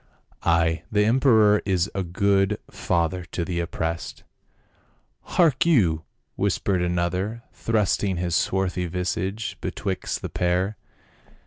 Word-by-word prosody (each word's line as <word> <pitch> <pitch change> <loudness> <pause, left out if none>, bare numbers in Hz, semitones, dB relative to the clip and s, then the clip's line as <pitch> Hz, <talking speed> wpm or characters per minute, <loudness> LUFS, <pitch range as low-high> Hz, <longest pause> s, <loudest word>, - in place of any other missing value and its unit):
Ay! 85 0 +2
the 105 -1 +3
emperor 110 -4 +4
is 95 -2 +1
a 95 - -1
good 95 +3 +1
father 85 +1 -1
to 85 0 -4
the 85 -1 -2
oppressed." 85 -1 -4 1.1
"Hark 160 -7 +4
you," 90 - +3 0.3
whispered 95 -3 0
another, 90 +6 -1
thrusting 105 -3 0
his 85 -1 -1
swarthy 95 -1 0
visage 95 +4 -3
betwixt 100 -3 -3
the - - -3
pair. 90 +4 0
95 Hz, 110 wpm, -24 LUFS, 85-105 Hz, 1.1 s, emperor